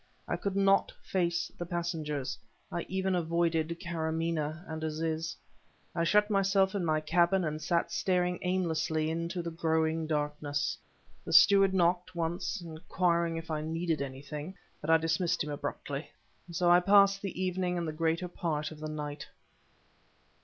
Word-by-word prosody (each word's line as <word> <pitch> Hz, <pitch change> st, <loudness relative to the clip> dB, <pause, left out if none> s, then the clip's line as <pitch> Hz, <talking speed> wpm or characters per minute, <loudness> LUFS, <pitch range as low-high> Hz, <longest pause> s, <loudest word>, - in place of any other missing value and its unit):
I -, -, 0 dB
could 200 Hz, -1 st, -3 dB
not 195 Hz, 0 st, +3 dB
face 170 Hz, -2 st, 0 dB
the 175 Hz, -, -3 dB
passengers; 160 Hz, -5 st, -2 dB, 0.4 s
I 170 Hz, -, -3 dB
even 190 Hz, 0 st, 0 dB
avoided 170 Hz, -1 st, 0 dB
Karamaneh 165 Hz, -1 st, -2 dB
and 160 Hz, 0 st, -5 dB
Aziz. 160 Hz, +1 st, -2 dB, 0.6 s
I 170 Hz, -, 0 dB
shut 210 Hz, +4 st, +4 dB
myself 195 Hz, -1 st, +3 dB
in 200 Hz, -3 st, -1 dB
my 155 Hz, -2 st, +2 dB
cabin 175 Hz, +4 st, +3 dB
and 155 Hz, -1 st, -3 dB
sat 170 Hz, +3 st, 0 dB
staring 180 Hz, -1 st, +1 dB
aimlessly 160 Hz, -3 st, 0 dB
into 170 Hz, +2 st, -3 dB
the 170 Hz, -, -4 dB
growing 160 Hz, -1 st, 0 dB
darkness. 150 Hz, -2 st, -1 dB, 0.5 s
The -, -, -4 dB
steward 195 Hz, -1 st, +7 dB
knocked, 180 Hz, 0 st, +1 dB
once, 170 Hz, +4 st, -2 dB
inquiring 170 Hz, +1 st, 0 dB
if 165 Hz, 0 st, -6 dB
I 155 Hz, -1 st, -1 dB
needed 165 Hz, 0 st, -1 dB
anything, 145 Hz, +6 st, -6 dB, 0.3 s
but 150 Hz, -, -5 dB
I 165 Hz, -, +7 dB
dismissed 165 Hz, +1 st, 0 dB
him 150 Hz, -, -5 dB
abruptly. 145 Hz, -, -4 dB, 0.4 s
So 175 Hz, +1 st, +2 dB
I 175 Hz, -, +8 dB
passed 200 Hz, +1 st, +5 dB
the 195 Hz, -3 st, -5 dB
evening 180 Hz, -1 st, 0 dB
and 170 Hz, -1 st, -2 dB
the 155 Hz, -, -3 dB
greater 165 Hz, +3 st, 0 dB
part 160 Hz, -4 st, -2 dB
of 155 Hz, -, -10 dB
the 155 Hz, 0 st, -5 dB
night. 150 Hz, -1 st, -5 dB
170 Hz, 155 wpm, -31 LUFS, 155-180 Hz, 0.6 s, I